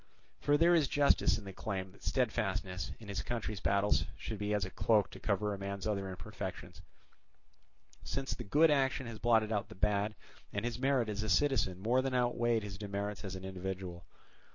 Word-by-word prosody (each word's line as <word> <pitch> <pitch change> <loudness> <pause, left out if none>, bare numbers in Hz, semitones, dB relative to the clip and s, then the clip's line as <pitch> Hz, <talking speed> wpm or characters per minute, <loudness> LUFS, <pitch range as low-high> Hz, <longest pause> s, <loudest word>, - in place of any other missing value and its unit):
For 145 0 +3
there 170 +3 +5
is 160 -5 +4
justice 145 +1 +4
in 105 - -9
the 95 - -7
claim 95 -2 -4
that - - -20
steadfastness 100 -7 -1
in 110 - -11
his 100 -1 -2
country's 110 -4 -3
battles 100 +1 +2
should 110 -3 -5
be 105 0 -1
as 105 -2 +1
a 95 - -7
cloak 105 -1 +2
to - - -10
cover 105 0 0
a 100 - -6
man's 100 0 -4
other 100 -3 -1
imperfections; 95 0 -7 1.2
since 135 0 -2
the - - -6
good 150 +9 +5
action 135 -1 +2
has 115 -2 -7
blotted 110 -2 +3
out 105 0 -1
the 110 - -10
bad, 105 +1 +1 0.4
and - - -2
his 120 0 -2
merit 135 -3 +2
as 105 -1 -2
a 110 - -2
citizen 130 -4 +2
more 120 +6 +2
than 130 -1 -1
outweighed 120 -2 +2
his 100 -1 -7
demerits 100 -1 -3
as 95 -2 -4
an 95 0 -7
individual. 95 -2 -5
105 Hz, 195 wpm, -34 LUFS, 100-120 Hz, 1.2 s, there